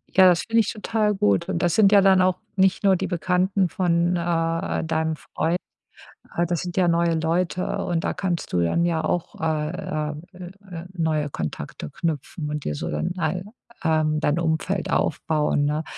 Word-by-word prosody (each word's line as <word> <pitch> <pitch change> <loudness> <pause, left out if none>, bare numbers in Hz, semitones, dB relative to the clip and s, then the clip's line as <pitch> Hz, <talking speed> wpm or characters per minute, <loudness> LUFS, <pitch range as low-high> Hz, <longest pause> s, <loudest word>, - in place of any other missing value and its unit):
Ja, 190 0 +8
das 175 -1 +3
finde 225 0 +3
ich 215 - -2
total 215 -1 0
gut 100 - +1
und - - -1
das 175 -2 +2
sind 205 -2 +5
ja 200 -1 +7
dann 190 -1 +5
auch 185 0 +3 0.2
nicht 190 0 +2
nur 195 -1 +5
die - - -2
Bekannten 185 +2 +1
von, 175 0 +1
äh, 165 -1 -1
deinem 160 0 0
Freund, 165 +3 -1 0.8
äh, 170 - +2
das 170 -1 -1
sind 180 0 -6
ja 180 -2 +4
neue 170 0 +2
Leute 170 +3 -1
und 170 -2 -1
da - - 0
kannst 175 -3 -3
du 90 - +2
dann 170 - +1
ja 165 -2 0
auch, 175 -1 -2
äh, 155 -1 -2
ähm, 150 - -8
äh, 185 +1 -11
äh, 170 - -9
neue 160 -4 0
Kontakte 75 - -5
knüpfen 155 - -3
und 150 -1 -3
dir 75 - -2
so - - -4
dann 75 - -2
ei 180 0 -1 0.4
ähm, 155 -1 +2
dein 150 +2 +1
Umfeld 170 +3 -1
aufbauen, 150 -2 +1
ne? 150 +2 0
170 Hz, 190 wpm, -24 LUFS, 155-185 Hz, 0.8 s, Ja